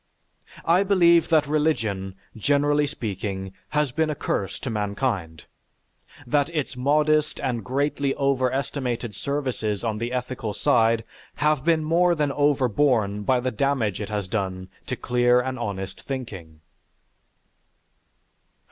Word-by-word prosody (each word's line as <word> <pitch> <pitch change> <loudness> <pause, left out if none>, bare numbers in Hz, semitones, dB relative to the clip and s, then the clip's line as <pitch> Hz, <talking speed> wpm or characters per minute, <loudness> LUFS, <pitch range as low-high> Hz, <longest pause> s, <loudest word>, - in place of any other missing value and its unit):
I 170 +3 +4
believe 175 -4 +4
that 155 -3 +4
religion, 115 -11 0 0.2
generally 145 +5 +2
speaking, 100 -7 -4 0.2
has 150 -3 +1
been 160 +4 0
a 150 - -1
curse 100 -8 -2
to 130 - -5
mankind; 100 - -2 0.8
that 145 +4 +1
its 150 -5 -3
modest 150 +3 +2
and 125 -5 -2
greatly 140 +3 0
overestimated 130 -3 -1
services 125 -4 -2
on 110 -2 -1
the 120 +2 -3
ethical 125 -4 -3
side 115 0 +3 0.3
have 150 -2 +1
been 165 -1 +2
more 170 +3 +3
than 150 -3 0
overborne 130 -7 +2
by 125 +5 +2
the 130 +1 -1
damage 115 -5 0
it 105 - -4
has 105 -3 -2
done 95 -2 -3 0.2
to 130 - -2
clear 125 0 +3
and 130 0 -3
honest 100 -4 -5
thinking. 95 - -7
130 Hz, 125 wpm, -24 LUFS, 105-145 Hz, 0.8 s, I